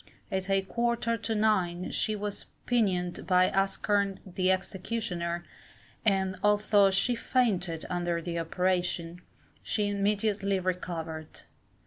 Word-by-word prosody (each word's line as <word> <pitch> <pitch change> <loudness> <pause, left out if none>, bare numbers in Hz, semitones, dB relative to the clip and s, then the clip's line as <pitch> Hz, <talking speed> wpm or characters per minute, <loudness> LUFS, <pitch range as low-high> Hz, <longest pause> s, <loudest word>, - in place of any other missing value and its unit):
At 190 0 -1
a 195 0 +3
quarter 235 +2 0
to 225 0 -3
nine 185 -5 +1
she 215 - +1
was 205 -1 -4 0.2
pinioned 185 -7 0
by 185 -1 +4
Askerne 195 0 +1
the 185 0 0
executioner, 185 -3 -2 0.6
and 190 -3 +1
although 210 -1 +4
she 195 +6 +2
fainted 195 -10 0
under 175 -1 -1
the 170 0 -3
operation, 175 0 -1 0.4
she 210 -2 0
immediately 200 0 +1
recovered. 165 -4 -4
190 Hz, 110 wpm, -29 LUFS, 180-210 Hz, 0.6 s, by